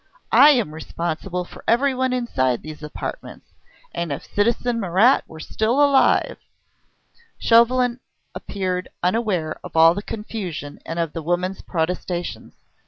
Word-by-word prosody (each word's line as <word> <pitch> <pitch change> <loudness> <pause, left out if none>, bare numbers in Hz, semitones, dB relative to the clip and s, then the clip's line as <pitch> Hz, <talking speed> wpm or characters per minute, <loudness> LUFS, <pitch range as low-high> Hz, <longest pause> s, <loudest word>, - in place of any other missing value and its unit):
I 295 - +8
am 240 - +2
responsible 170 +3 -4
for - - -14
everyone 260 +2 +2
inside 130 - 0
these 155 0 -9
apartments... 150 -1 -7 0.4
and 170 -3 -3
if 140 - -5
citizen 235 +3 0
Marat 200 +6 +4
were 160 - -12
still 220 - -1
alive 285 -2 +3 0.5
" - - -45 0.3
Chauvelin 240 +1 +3 0.3
appeared 185 -2 -4
unaware 180 -5 0
of - - -7
all 165 +1 +7
the 200 - -4
confusion 190 -10 -6
and 165 - -4
of 165 -3 -2
the 165 - -4
woman's 175 +4 -2
protestations. 175 +1 -3
185 Hz, 130 wpm, -22 LUFS, 165-235 Hz, 0.5 s, I